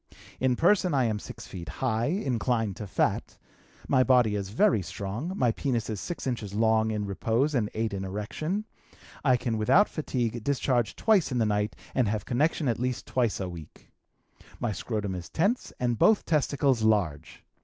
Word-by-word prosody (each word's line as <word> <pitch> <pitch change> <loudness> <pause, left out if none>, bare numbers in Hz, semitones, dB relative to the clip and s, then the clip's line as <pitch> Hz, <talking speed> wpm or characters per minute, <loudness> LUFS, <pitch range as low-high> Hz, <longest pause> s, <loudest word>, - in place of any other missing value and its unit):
"In 130 -1 +2
person 180 +1 +3
I 130 - +3
am 110 -3 0
6 - - -9
feet 85 -3 -8
high, 115 - -1
inclined 120 - 0
to 105 - -6
fat; - - -1 0.5
my 130 -2 +4
body 125 -4 +4
is 100 -2 -3
very 105 0 +3
strong; 100 - -5
my 120 -2 +3
penis 115 -2 -2
is 105 - -4
six 175 - -5
inches 115 -6 -3
long 110 0 +3
in 105 -1 -2
repose 115 +8 0
and 110 -6 +1
eight 110 -1 -1
in 95 -1 -3
erection; 115 - -3 0.6
I 130 -3 +4
can 115 -3 -2
without 180 - +5
fatigue 120 -7 -2
discharge 125 -3 0
twice 205 -9 +3
in 125 - -1
the 115 - +2
night 105 0 0 0.2
and 125 -4 +2
have 105 -1 -2
connection 150 +4 +1
at 115 - 0
least 125 0 -2
twice 120 -5 0
a 95 - -2
week. 85 -4 -11 0.7
My 120 - -1
scrotum 105 -2 -3
is 90 -2 -6
tense 205 +10 0
and 120 -2 0
both 215 -1 +4
testicles 140 -5 +1
large. 90 -9 0
115 Hz, 175 wpm, -28 LUFS, 105-135 Hz, 0.7 s, without